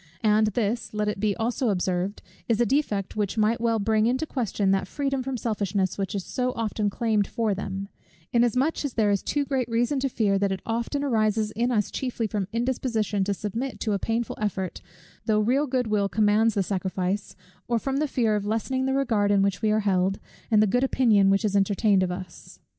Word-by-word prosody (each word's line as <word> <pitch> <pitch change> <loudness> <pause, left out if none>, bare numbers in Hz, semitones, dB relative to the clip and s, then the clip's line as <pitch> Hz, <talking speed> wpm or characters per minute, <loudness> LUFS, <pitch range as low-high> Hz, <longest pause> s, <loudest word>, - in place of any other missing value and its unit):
And 215 0 +4
this, 215 0 -2
let 210 0 0
it 210 -1 -2
be 205 -1 +1
also 235 +2 -1
observed, 185 0 -1 0.3
is 230 -1 +2
a 240 - +4
defect 210 -7 0
which 210 0 -1
might 220 +2 +2
well 230 -1 +2
bring 220 +1 +2
into 260 +5 0
question 215 -8 -1
that 195 -1 +1
freedom 275 +3 -2
from 260 0 -3
selfishness, 200 -4 -1
which 195 0 -3
is 195 - -2
so 250 0 -1
often 215 -2 -1
claimed 215 -1 0
for 225 -3 0
them; 195 0 -4 0.5
inasmuch 250 +7 +2
as 285 -4 -3
there 215 -3 +3
is 200 - +1
too 290 -1 -1
great 260 -3 -1
reason 240 +4 +1
to 270 +1 0
fear, 200 -5 +1
that 200 -1 +1
it 190 - -4
often 235 +5 -2
arises 215 -4 +1
in 235 +4 0
us 210 -5 0
chiefly 250 -3 -2
from 205 -3 -2
indisposition 230 -4 -1
to 200 - 0
submit 230 +7 -4
to 215 - 0
a 200 - 0
painful 230 +2 -2
effort, 190 -3 -2 0.5
though 215 -1 +3
real 260 +7 +2
good 255 -1 0
will 210 -2 +1
commands 215 +2 +3
the 200 - +2
sacrifice, 190 +1 -2 0.3
or 235 - +1
from 270 +4 -2
the 300 +1 +1
fear 230 -5 +1
of 205 - -1
lessening 260 +5 -1
the 265 - +1
regard 225 -7 +1
in 200 -1 +4
which 195 -1 0
we 220 - +2
are 215 +1 +2
held, 195 -1 +1 0.3
and 215 -1 +5
the - - +4
good 245 +6 +1
opinion 225 -7 +4
which 195 +3 +2
is 205 -1 0
entertained 200 0 +3
of 185 -1 0
us. 180 -1 -9
215 Hz, 210 wpm, -25 LUFS, 200-240 Hz, 0.5 s, and